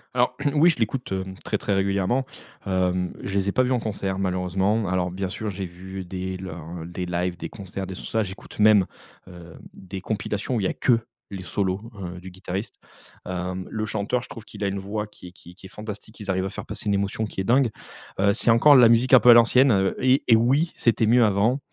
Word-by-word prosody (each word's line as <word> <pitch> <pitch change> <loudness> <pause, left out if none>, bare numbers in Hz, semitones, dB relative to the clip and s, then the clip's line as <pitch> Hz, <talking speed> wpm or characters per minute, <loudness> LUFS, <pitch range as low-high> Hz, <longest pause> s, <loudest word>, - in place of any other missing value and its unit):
Alors, 125 0 +2 0.2
oui 165 +4 +6
je 140 - -7
l'écoute, 120 +1 -2
hem, 95 0 -4
très - - -2
très 100 - -1
régulièrement, 100 +6 +1 0.4
hem, 90 -1 0
je 100 - -5
les 100 0 +1
ai - - +1
pas 130 - +2
vus 125 0 0
en 125 - +2
concert, 100 -3 -3
malheureusement. 95 +3 0
Alors, 90 -1 0
bien 95 0 -3
sûr, 105 +2 -4
j'ai 95 0 -5
vu 95 +2 -8
des 95 +1 -5
leurs 85 -2 -7
des 90 +1 -5
lives, 90 0 -2
des - - -6
concerts 95 -1 -7
des 95 - -7
tout - - -7
ça. 110 -1 0
J'écoute 95 0 -10
même, 105 -3 +5 0.4
heu, 85 -2 -12 0.2
des 95 0 -8
compilations 105 +3 -3
où - - +1
il - - -2
y - - +2
a - - -2
que 120 -3 +2 0.3
les 95 -2 -7
solos, 100 +5 -2
heu, 90 0 -6
du 95 0 -10
guitariste. 95 +3 -5 0.5
Hem, 90 0 -4
le 110 0 -3
chanteur, 110 +4 -1
je - - -12
trouve 115 -2 -10
qu'il - - -8
a - - +1
une 100 0 -2
voix 105 +2 -4
qui 100 -3 -14
est - - -11
qui 90 -1 -15
qui 95 +1 -13
est - - -18
fantastique. 105 +1 -9
Ils 100 -2 -3
arrivent 95 0 -1
à - - -2
faire - - -7
passer - - -4
une 100 - +2
émotion, 100 +2 -1
qui 95 - -8
est - - -2
dingue. 125 +3 +3 0.5
Heu, 100 +1 +4
c'est 120 - +1
encore 140 +6 +7
la 120 -3 +8
musique 120 +3 +3
un 130 - +10
peu 120 - +5
à - - +12
l'ancienne, 125 +3 +5
heu 95 -1 +2
et 130 +1 +4
et 115 - +7
oui, 135 +9 +2
c'était 115 -1 +2
mieux 120 +2 +5
avant, 110 +6 +2
100 Hz, 240 wpm, -24 LUFS, 95-115 Hz, 0.5 s, à